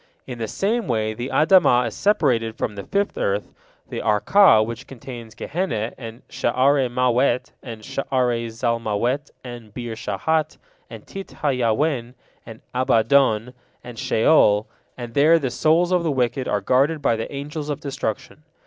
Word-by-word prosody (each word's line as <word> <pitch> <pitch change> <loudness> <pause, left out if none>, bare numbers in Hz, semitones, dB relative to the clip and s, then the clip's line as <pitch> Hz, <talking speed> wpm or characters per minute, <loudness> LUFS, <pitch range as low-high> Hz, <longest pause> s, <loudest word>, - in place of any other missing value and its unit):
In 125 -2 -8
the 110 - -3
same 220 - -1
way 110 -2 -1
the 120 +4 -5
Adamah 155 -7 +4
is 115 - -4
separated 115 - +1
from 105 - -2
the 100 -1 -8
fifth 200 0 -1
earth, 100 +1 -2 0.3
the - - -5
Arka, 110 - +4
which 115 +3 -7
contains 120 -3 -10
Gehenna, 145 - -3
and 115 -1 -10
Sha'are 130 +2 +1
Mawet, 125 +1 +1
and 115 -3 -9
Sha'are 125 -3 -1
Zalmawet, 115 +4 -1
and 120 -4 -10
Beer 120 -2 -5
Shahat, 150 +9 -1 0.3
and - - -11
Tit 195 0 -8
ha 150 - +3
Yawen, 125 0 0 0.3
and 115 -1 -11
Abaddon, 125 -1 +2 0.3
and 120 -2 -9
Sheol, 110 -4 +3 0.3
and 120 -2 -7
there 155 +5 +5
the 135 -6 -2
souls 165 +7 +2
of 180 -1 +3
the 165 - -1
wicked 125 -1 -1
are 105 - 0
guarded 140 +8 +1
by 115 - +3
the 115 - -5
Angels 145 +2 -5
of 145 - -3
Destruction. 135 -1 -5
125 Hz, 155 wpm, -22 LUFS, 115-145 Hz, 0.3 s, there